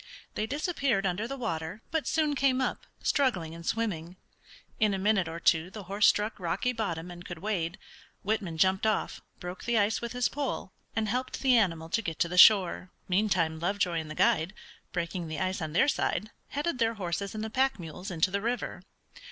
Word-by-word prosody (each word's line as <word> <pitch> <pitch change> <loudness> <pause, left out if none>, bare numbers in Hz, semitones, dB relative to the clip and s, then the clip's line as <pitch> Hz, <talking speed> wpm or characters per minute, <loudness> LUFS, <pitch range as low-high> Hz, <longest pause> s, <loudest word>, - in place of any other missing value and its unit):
They 215 - -2
disappeared 280 - 0
under 190 +5 -1
the 275 +2 -5
water, 185 -3 -4
but 320 -2 -1
soon 310 -2 +2
came 265 -2 +2
up, 260 - -2 0.2
struggling 195 - +1
and 170 0 -9
swimming. 180 -5 -2 0.6
In 210 -2 +3
a - - -2
minute 195 -2 +2
or 165 +1 -5
two 165 +1 +3
the 205 +1 -8
horse 200 +3 +3
struck 210 +1 +2
rocky 185 +8 0
bottom 180 -7 -3
and 175 0 -9
could 175 -1 -7
wade. 175 -2 -2 0.5
Whitman 200 -6 -1
jumped 190 +5 +3
off, 215 - -1 0.2
broke 180 +1 -7
the 235 -1 +2
ice 210 +1 +2
with 235 0 -4
his 250 0 +2
pole, 275 -9 -3 0.2
and 220 0 0
helped 250 +4 -2
the 260 -2 +5
animal 165 -8 +2
to 230 - +1
get 165 -6 -4
to 170 - +2
the 180 +1 +1
shore. 190 -3 +7 0.2
Meantime 180 -5 +1
Lovejoy 175 -1 0
and 160 -1 -6
the 155 - -6
guide, 165 +6 +2 0.4
breaking 175 0 -3
the 155 -1 -4
ice 185 -1 -1
on 155 -1 -4
their 175 - +4
side, 215 -6 0 0.2
headed 290 -1 -2
their 230 -1 +2
horses 195 +1 -3
and 215 - -3
the 220 - -4
pack 265 +1 +2
mules 180 +2 -7
into 175 0 +1
the 200 +1 -1
river. 240 +3 -2
195 Hz, 200 wpm, -29 LUFS, 170-230 Hz, 0.6 s, shore